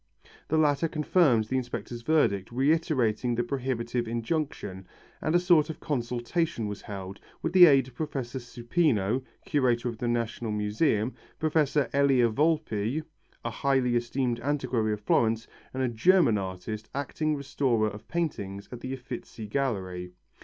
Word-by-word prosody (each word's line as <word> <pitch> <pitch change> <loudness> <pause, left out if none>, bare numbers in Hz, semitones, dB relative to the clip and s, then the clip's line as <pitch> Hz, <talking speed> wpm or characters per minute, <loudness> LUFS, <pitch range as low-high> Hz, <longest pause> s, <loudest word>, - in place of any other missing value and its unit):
The 160 - +1
latter 150 0 +3
confirmed 150 -6 +3
the 130 +5 -1
inspector's 120 -2 -4
verdict, 115 -10 +1
reiterating 130 -4 +1
the 120 - +1
prohibiting 120 -2 -2
injunction, 115 - -3 0.3
and 155 - 0
a - - +6
sort 175 -4 +4
of 160 - -6
consultation 125 +1 -1
was 105 0 -5
held, 95 -1 -7 0.2
with 165 - -1
the 180 -2 +10
aid 135 -4 +5
of 130 - -13
Professor 130 -3 -4
Supino, 120 - 0 0.2
curator 125 -4 +1
of 115 -2 -7
the 120 - -1
National 115 -1 -1
Museum, 105 +3 +1 0.2
Professor 150 -3 +2
Elia 135 -4 +4
Volpi, 150 -2 0 0.4
a - - -1
highly 130 -3 +1
esteemed 120 0 0
antiquary 130 -5 0
of 105 - -5
Florence, 115 +2 +2 0.3
and 130 0 -2
a - - +2
German 120 - +4
artist, 95 +3 -5
acting 150 +2 -1
restorer 130 -5 +1
of 105 +1 -11
paintings 100 - -3
at 125 - -7
the 130 +2 -5
Uffizi 125 -3 -8
Gallery. 95 -8 -2
125 Hz, 145 wpm, -28 LUFS, 110-145 Hz, 0.4 s, the